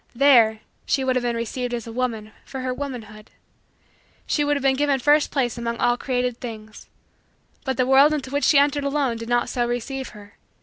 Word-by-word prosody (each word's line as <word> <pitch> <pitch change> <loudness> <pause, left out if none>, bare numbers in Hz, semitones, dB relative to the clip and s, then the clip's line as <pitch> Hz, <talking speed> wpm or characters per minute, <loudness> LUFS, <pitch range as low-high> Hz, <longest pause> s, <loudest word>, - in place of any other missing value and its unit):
There, 235 -5 +5 0.3
she 270 - +1
would 260 -1 +1
have 255 - +1
been 240 -1 -1
received 240 +2 -3
as 235 - -6
a 230 - -8
woman 225 -3 -3
for 265 - -7
her 255 0 -2
womanhood; 230 -6 -7 1.0
she 295 - 0
would 290 0 +1
have 280 - -6
been 270 -1 +3
given 285 -1 +1
first 295 +3 +3
place 245 -4 -1
among 235 0 -3
all 240 +1 +2
created 250 -1 -2
things. 215 -3 -9 0.8
But 265 -2 -2
the 255 - +2
world 270 +3 +6
into 275 -4 -3
which 285 +1 0
she 295 - +5
entered 285 0 +3
alone 280 -4 0
did 230 +1 -7
not 240 0 +1
so 240 -1 -1
receive 255 +2 -4
her. 205 0 -15
250 Hz, 205 wpm, -23 LUFS, 235-275 Hz, 1.0 s, world